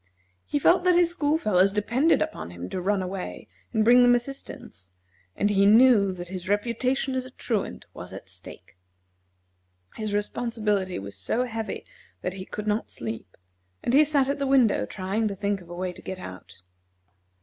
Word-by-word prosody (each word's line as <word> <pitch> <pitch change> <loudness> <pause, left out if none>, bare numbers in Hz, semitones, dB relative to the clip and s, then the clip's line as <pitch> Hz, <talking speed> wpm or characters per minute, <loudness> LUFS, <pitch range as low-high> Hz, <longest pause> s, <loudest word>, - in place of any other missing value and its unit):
He - - 0
felt 350 +5 +4
that 365 -1 +4
his 345 -1 +5
school 310 -3 +1
fellows 195 - +3
depended 240 +12 +2
upon 315 - -6
him 90 +1 -7
to 185 - -3
run 195 +1 +1
away 185 0 -6 0.2
and 220 -2 +2
bring 245 +2 +7
them 245 0 +6
assistance, 240 - -6 0.5
and 205 - +1
he 200 0 +4
knew 220 -3 +6
that 175 -1 -7
his 185 0 -6
reputation 245 +6 0
as 260 0 -1
a 255 - -9
Truant 230 -4 -3
was - - -7
at - - -9
stake. 90 - -11 1.2
His 215 -1 -3
responsibility 210 -2 -1
was 100 0 -7
so 100 - -1
heavy 225 -3 -4 0.4
that 180 - -2
he 190 -1 -7
could 210 - -5
not 215 +1 -1
sleep, 110 -4 -6 0.5
and 235 - 0
he 290 +3 +7
sat 285 -3 +2
at 280 +1 -1
the 280 - 0
window, 260 -5 +3
trying 200 +3 -1
to 200 - -3
think 200 0 -1
of 170 - -15
a 175 - -7
way 180 0 -3
to - - -12
get 190 - -6
out. 95 - -10
210 Hz, 180 wpm, -26 LUFS, 185-255 Hz, 1.2 s, bring